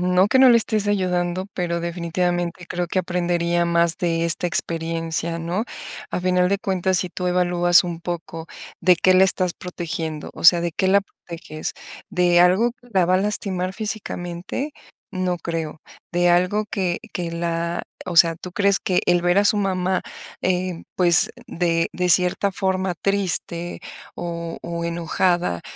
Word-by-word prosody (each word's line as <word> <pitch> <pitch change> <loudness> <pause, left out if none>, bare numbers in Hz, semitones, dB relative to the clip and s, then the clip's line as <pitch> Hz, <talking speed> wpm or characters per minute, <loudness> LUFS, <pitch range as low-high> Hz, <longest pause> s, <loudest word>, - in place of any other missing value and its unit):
no 180 +2 +3
que 260 - +3
no 260 -1 +8
le 235 - +7
estés 215 -2 0
ayudando, 180 -2 0
pero 170 -1 -2
definitivamente 175 0 -2
creo 175 0 -2
que 185 - -1
aprendería 175 -1 0
más 170 -1 +2
de 165 -1 0
esta 170 +1 -1
experiencia, 165 0 -2
¿no? 175 +6 -2 0.5
A - - -2
final 180 0 +2
de 200 - +1
cuentas, 190 -2 0
si 180 - -2
tú 180 - -4
evalúas 175 -1 +4
un 170 -1 -5
poco, 165 -1 -6 0.3
¿de 180 0 +5
qué 185 +2 +4
la 190 +1 +7
estás 185 -2 0
protegiendo? 165 -3 -5
O - - -9
sea, 170 0 +8
¿de 170 -2 -2
qué 190 - 0
la 200 +1 +4
proteges? 165 -5 -8 0.4
¿De 180 -2 +3
algo 190 +7 +4
que 245 0 -23
la 185 -2 +4
va 180 - +3
a - - +4
lastimar 190 -2 -2
físicamente? 210 - -4 0.4
No 185 -1 -1
creo, 160 -2 -4 0.3
¿de 175 0 +3
algo 180 +5 +2
que 180 -3 -1
que 175 -2 -3
la 170 0 -2 0.3
o 180 - -3
sea, 165 -1 +6
tú 180 +1 -9
crees 200 +1 +2
que 185 - +1
el 175 0 +4
ver 175 +1 +2
a 200 - +4
su 205 - +4
mamá, 190 -2 0 0.4
eh, 180 -1 -1
pues, 175 -3 +5 0.2
de 165 -1 0
de 180 0 -1
cierta 180 +3 +3
forma 190 -1 -1
triste 175 -3 -1 0.4
o 170 -1 -5
o 170 0 -4
enojada, 170 - 0
175 Hz, 165 wpm, -22 LUFS, 170-185 Hz, 0.5 s, no